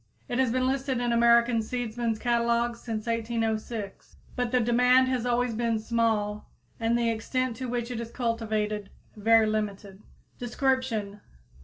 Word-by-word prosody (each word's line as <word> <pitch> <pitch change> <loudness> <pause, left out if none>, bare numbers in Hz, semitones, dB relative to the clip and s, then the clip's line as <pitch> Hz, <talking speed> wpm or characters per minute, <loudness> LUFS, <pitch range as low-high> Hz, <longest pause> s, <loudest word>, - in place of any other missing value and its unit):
It 245 - -2
has 260 -3 +2
been 255 +1 +1
listed 265 -1 0
in 240 -1 0
American 235 0 +4
seedsmen's 230 -1 -2
catalogues 235 0 0
since 220 -2 -4
1806, 225 -2 -3 0.2
but 245 -1 -1
the 250 - +3
demand 250 +2 +4
has 250 -2 -1
always 245 0 +1
been 230 0 0
small 215 -2 -1 0.3
and 230 +1 +1
the 235 -1 +1
extent 255 +2 -2
to 255 -1 -4
which 240 0 -3
it 235 - -3
is 230 -1 -5
cultivated 215 -4 -2 0.3
very 225 +1 +4
limited. 205 -2 -3 0.4
_Description. 245 -5 -1
235 Hz, 145 wpm, -27 LUFS, 220-245 Hz, 0.4 s, American